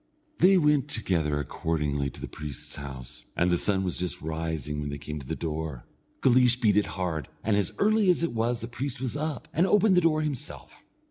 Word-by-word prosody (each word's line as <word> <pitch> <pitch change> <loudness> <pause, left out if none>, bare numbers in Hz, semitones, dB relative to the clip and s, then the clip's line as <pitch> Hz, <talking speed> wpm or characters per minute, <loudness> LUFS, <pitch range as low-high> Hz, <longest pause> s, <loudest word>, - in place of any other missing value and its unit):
They 190 +1 +6
went 150 -4 +3
together 85 - 0
accordingly 75 -1 -1
to - - -12
the - - -5
priest's 75 -4 -5
house, 65 -3 -8
and 90 +1 +2
the - - +4
sun 95 -2 +2
was 90 -2 -1
just 90 -4 -2
rising 80 -2 -3
when 70 - -3
they 70 - -4
came 75 +1 -6
to 65 - -10
the - - -2
door. 80 -5 -4 0.4
Guleesh 125 -1 +5
beat 105 -5 +3
it 105 - +3
hard, 80 -6 -2 0.2
and 110 -1 +2
as 100 -3 +1
early 215 -1 +3
as 175 -2 +3
it 170 - 0
was 115 +1 0
the 115 - -4
priest 130 +2 -4
was 130 0 -3
up, 150 -2 -3
and 175 +4 +3
opened 210 0 +4
the 180 - +5
door 155 -2 +2
himself. 150 0 -6
100 Hz, 210 wpm, -27 LUFS, -, 0.4 s, They